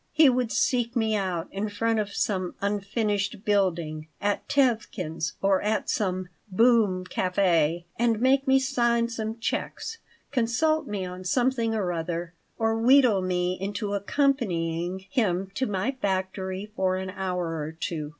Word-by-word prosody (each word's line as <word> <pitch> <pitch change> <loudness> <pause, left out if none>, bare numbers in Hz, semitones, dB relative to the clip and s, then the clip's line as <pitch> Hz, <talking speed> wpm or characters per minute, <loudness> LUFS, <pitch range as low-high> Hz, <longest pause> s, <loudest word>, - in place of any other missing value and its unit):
He 310 -4 +6
would 250 -2 0
seek 245 -2 +1
me 220 -2 +1
out 185 -4 -1
in 200 +2 -2
front 225 +2 0
of 205 -1 -2
some 185 -3 -1
unfinished 205 +1 -1
building, 170 -6 0
at 205 0 -1
Tevkin's, 210 - 0
or 195 -1 +3
at 210 0 0
some 185 -3 -1 0.2
"boom" 210 -3 +3
café, 175 -3 +1 0.2
and 230 -2 +2
make 270 +3 +3
me 265 0 +6
sign 235 -3 +1
some 225 -1 -4
checks, 445 - -3 0.3
consult 285 +6 +1
me 205 -3 -3
on 180 0 -7
something 235 +2 +1
or 190 -5 0
other, 170 +1 -3 0.2
or 225 0 +1
wheedle 250 -5 +5
me 180 0 0
into 205 +1 -3
accompanying 190 - 0
him 195 -7 0
to 260 +5 -1
my 205 +6 -1
factory 190 +1 -2
for 185 -2 +1
an 185 0 -4
hour 180 -3 -2
or 150 +1 -4
two. 155 -3 -3
205 Hz, 145 wpm, -26 LUFS, 185-235 Hz, 0.3 s, He